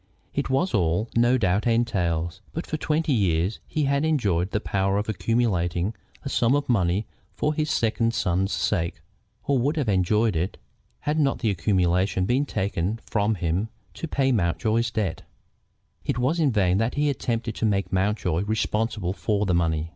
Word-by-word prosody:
It 140 Hz, -, -2 dB
was 150 Hz, +8 st, +1 dB
all, 90 Hz, +2 st, +1 dB
no 120 Hz, +2 st, +4 dB
doubt, 100 Hz, -1 st, +1 dB
entailed, 90 Hz, -7 st, 0 dB
but 165 Hz, -, -4 dB
for -, -, -3 dB
twenty 155 Hz, -1 st, 0 dB
years 95 Hz, -2 st, +1 dB
he 155 Hz, -, -1 dB
had 140 Hz, +1 st, +1 dB
enjoyed 100 Hz, -, +1 dB
the 105 Hz, -, -1 dB
power 95 Hz, -1 st, 0 dB
of 105 Hz, -, -1 dB
accumulating 100 Hz, -4 st, 0 dB, 0.3 s
a -, -, -5 dB
sum 125 Hz, -1 st, +2 dB
of 145 Hz, -, -1 dB
money 95 Hz, -3 st, +1 dB, 0.3 s
for 150 Hz, -, 0 dB
his 155 Hz, 0 st, -1 dB
second 115 Hz, -2 st, +1 dB
son's 95 Hz, +3 st, 0 dB
sake, 85 Hz, -4 st, -1 dB, 0.4 s
or 140 Hz, -2 st, +1 dB
would 145 Hz, +6 st, 0 dB
have 145 Hz, -6 st, 0 dB
enjoyed 105 Hz, +2 st, +2 dB
it, 85 Hz, +4 st, -2 dB, 0.4 s
had 150 Hz, +2 st, 0 dB
not 140 Hz, -2 st, +2 dB
the 110 Hz, -, 0 dB
accumulation 95 Hz, 0 st, +1 dB
been 130 Hz, +7 st, +1 dB
taken 100 Hz, +1 st, -1 dB
from 105 Hz, 0 st, +1 dB
him 90 Hz, +4 st, -1 dB, 0.2 s
to 165 Hz, -, -5 dB
pay 135 Hz, -3 st, +1 dB
Mountjoy's 110 Hz, +3 st, +1 dB
debts. 105 Hz, -6 st, -2 dB, 0.8 s
It -, -, -1 dB
was 135 Hz, +8 st, +1 dB
in 150 Hz, -4 st, +3 dB
vain 95 Hz, -4 st, +2 dB
that 115 Hz, +2 st, 0 dB
he 145 Hz, +1 st, +1 dB
attempted 120 Hz, -4 st, -1 dB
to -, -, 0 dB
make 100 Hz, -2 st, -1 dB
Mountjoy 95 Hz, -3 st, +1 dB
responsible 110 Hz, -3 st, -1 dB
for 100 Hz, +3 st, 0 dB
the 90 Hz, -, +1 dB
money. 80 Hz, -2 st, 0 dB
105 Hz, 170 wpm, -25 LUFS, 90-125 Hz, 0.8 s, no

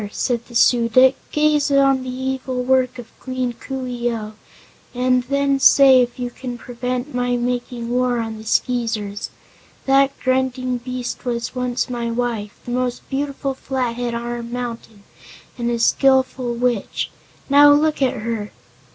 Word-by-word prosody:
said 235 Hz, -1 st, -1 dB
the 235 Hz, -, -13 dB
Su 235 Hz, 0 st, +4 dB
dic, 260 Hz, +3 st, +5 dB, 0.2 s
"gaze 300 Hz, -1 st, +2 dB
on 275 Hz, -1 st, +3 dB
the 255 Hz, -, -6 dB
evil 260 Hz, 0 st, -3 dB
work 255 Hz, 0 st, +2 dB
of 240 Hz, -2 st, -10 dB
Queen 255 Hz, -2 st, -3 dB
Coo 265 Hz, +2 st, -6 dB
ee 240 Hz, -1 st, -2 dB
oh, 215 Hz, -2 st, -5 dB, 0.6 s
and 255 Hz, 0 st, +2 dB
then 280 Hz, +1 st, +1 dB
say 270 Hz, -1 st, +7 dB
if 245 Hz, -1 st, -2 dB
you 245 Hz, -1 st, -4 dB
can 245 Hz, -1 st, -7 dB
prevent 250 Hz, +3 st, -4 dB
my 245 Hz, 0 st, 0 dB
making 245 Hz, -1 st, -3 dB
war 250 Hz, 0 st, +1 dB
on 225 Hz, -1 st, -4 dB
the -, -, -10 dB
Skeezers. 220 Hz, -3 st, -1 dB, 0.6 s
That 275 Hz, 0 st, +4 dB
grunting 255 Hz, -1 st, 0 dB
beast 250 Hz, 0 st, -5 dB
was 235 Hz, -2 st, -3 dB
once 250 Hz, -1 st, -1 dB
my 240 Hz, -2 st, -3 dB
wife 230 Hz, -3 st, -3 dB
the 245 Hz, -, -5 dB
most 250 Hz, 0 st, -2 dB
beautiful 275 Hz, 0 st, -2 dB
Flathead 245 Hz, -3 st, -3 dB
on 235 Hz, -, -3 dB
our 240 Hz, 0 st, -4 dB
mountain 235 Hz, -3 st, -6 dB, 0.5 s
and 240 Hz, -1 st, -2 dB
a 240 Hz, -, 0 dB
skillful 260 Hz, 0 st, +2 dB
witch. 240 Hz, -3 st, -1 dB, 0.4 s
Now 290 Hz, +1 st, +7 dB
look 300 Hz, 0 st, +2 dB
at 260 Hz, -5 st, +1 dB
her!" 220 Hz, -2 st, -4 dB
250 Hz, 155 wpm, -20 LUFS, 235-260 Hz, 0.6 s, say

